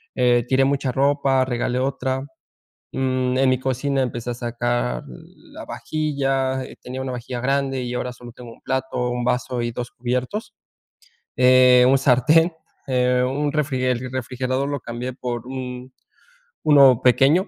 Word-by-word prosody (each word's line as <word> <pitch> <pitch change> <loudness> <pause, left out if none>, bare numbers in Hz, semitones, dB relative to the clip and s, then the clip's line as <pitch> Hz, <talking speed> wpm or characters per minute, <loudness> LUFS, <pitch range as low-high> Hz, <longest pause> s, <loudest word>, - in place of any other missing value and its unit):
eh, 120 -1 +3
tiré 130 +1 +3
mucha 140 -1 0
ropa, 135 0 +2
regalé 125 0 -1
otra, 130 0 -1 0.7
mm, 130 -1 0
en 135 0 +3
mi 130 -1 +2
cocina 135 +1 -1
empecé 120 -1 -4
a - - -3
sacar 120 - -2
la - - -13
vajilla, 135 -4 -1 0.2
tenía 130 +1 -6
una 130 -1 -4
vajilla 125 0 -5
grande 135 0 0
y 125 0 -4
ahora 125 0 -3
solo 120 -1 -12
tengo 120 0 -11
un - - -18
plato, 130 -2 -2
un 120 0 -2
vaso 125 0 -1
y 120 - -2
2 120 +1 -6
cubiertos, 125 - -3 0.8
eh, 125 0 +6
un 135 - +5
sartén, 140 +6 +4 0.4
eh, 125 -1 +2
un 145 +3 -1
refrige 135 -4 0
el 125 +1 -4
refrigerador 130 +1 -2
lo 145 -1 -3
cambié 120 +2 -5
por 120 -2 -5
un 130 -1 -7 0.7
uno 140 -5 +6
pequeño, 140 - +4
130 Hz, 150 wpm, -22 LUFS, 125-135 Hz, 0.8 s, eh